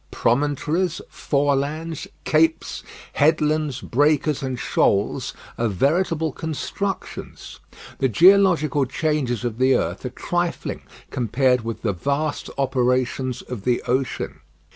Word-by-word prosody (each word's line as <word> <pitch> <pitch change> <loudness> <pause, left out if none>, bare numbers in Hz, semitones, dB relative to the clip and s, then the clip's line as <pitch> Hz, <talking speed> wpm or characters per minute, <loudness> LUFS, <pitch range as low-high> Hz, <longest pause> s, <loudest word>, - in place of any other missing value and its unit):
Promontories, 150 +7 0
forelands, 145 +3 -1 0.2
capes, 160 +1 +1 0.3
headlands, 150 -2 +2
breakers, 145 +2 +2
and 130 -2 -3
shoals 100 -3 +1 0.2
are 115 - +2
veritable 160 - +1
constructions. 165 +6 -5 0.4
The 130 - +2
geological 170 - +5
changes 130 -5 -1
of 120 -1 -3
the 130 +1 +4
earth - - -2
are - - -3
trifling - - -2 0.3
compared 125 +1 +2
with 115 0 -5
the 105 -3 +1
vast 140 - -2
operations 130 -1 0
of 120 -6 -7
the 125 +1 +1
ocean. 130 +1 -2
140 Hz, 105 wpm, -22 LUFS, 125-155 Hz, 0.4 s, geological